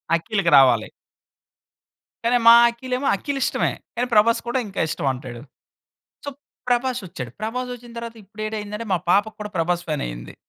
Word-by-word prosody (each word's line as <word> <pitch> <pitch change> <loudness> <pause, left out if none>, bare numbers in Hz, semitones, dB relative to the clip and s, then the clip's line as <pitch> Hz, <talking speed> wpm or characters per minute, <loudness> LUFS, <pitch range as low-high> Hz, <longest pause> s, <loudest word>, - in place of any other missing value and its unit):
అఖిల్‌కి 175 +1 0
రావాలి. 125 -5 +5 1.3
కానీ 240 +1 +3
మా 230 - +11 0.2
అఖిల్ 250 +2 -7
ఏమో 275 +2 -2
అఖిల్ 275 +7 -4
ఇష్టమే, - - 0 0.2
కానీ 245 +1 -1
ప్రభాస్ 230 +2 +4
కూడా 240 +2 0
ఇంకా 200 - -6
ఇష్టం 145 - -3
అంటాడు. 125 -2 -8 0.8
సో - - -2 0.4
ప్రభాస్ 245 0 +1
వచ్చాడు. 125 -9 -7
ప్రభాస్ 250 +3 -3
వచ్చిన 240 0 -14
తరువాత 235 0 -6
ఇప్పుడు 215 +2 -9
ఏటయిందంటే, 210 +1 -5
మా - - +3
పాప 200 +3 +5 0.2
కూడా 210 -1 -6
ప్రభాస్ 175 +1 0
ఫ్యాన్ 150 -2 -1
అయింది. - - -9
210 Hz, 160 wpm, -22 LUFS, 170-235 Hz, 1.3 s, మా